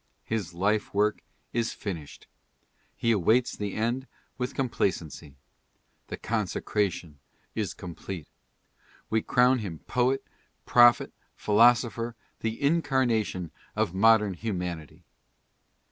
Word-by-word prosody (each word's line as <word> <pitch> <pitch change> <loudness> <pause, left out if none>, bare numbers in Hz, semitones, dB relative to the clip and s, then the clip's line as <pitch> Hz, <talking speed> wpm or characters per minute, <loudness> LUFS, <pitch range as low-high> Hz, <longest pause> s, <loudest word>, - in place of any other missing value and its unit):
His 100 -7 -3
life 105 +3 0
work 105 +1 +2 0.3
is 115 0 0
finished. 85 -8 -7 0.7
He 115 - +1
awaits 110 +4 +3
the 105 -1 -4
eiid 120 +4 -1 0.3
with 125 -1 -4
com 135 - 0
placency. 80 - -3 0.7
The - - -5
consecration 90 -8 -2 0.3
is - - -3
complete. 90 -1 -7 0.8
We 110 0 +2
crown 125 +3 +3
him 95 -7 -5
poet, 125 +2 +1 0.4
prophet, 120 -1 +5 0.2
philosopher, 115 +1 +3 0.2
the 110 0 -3
incarnation 130 - +1 0.2
of 85 - 0
modern 105 0 +4
humanity. 90 - -5
110 Hz, 100 wpm, -28 LUFS, 90-120 Hz, 0.8 s, prophet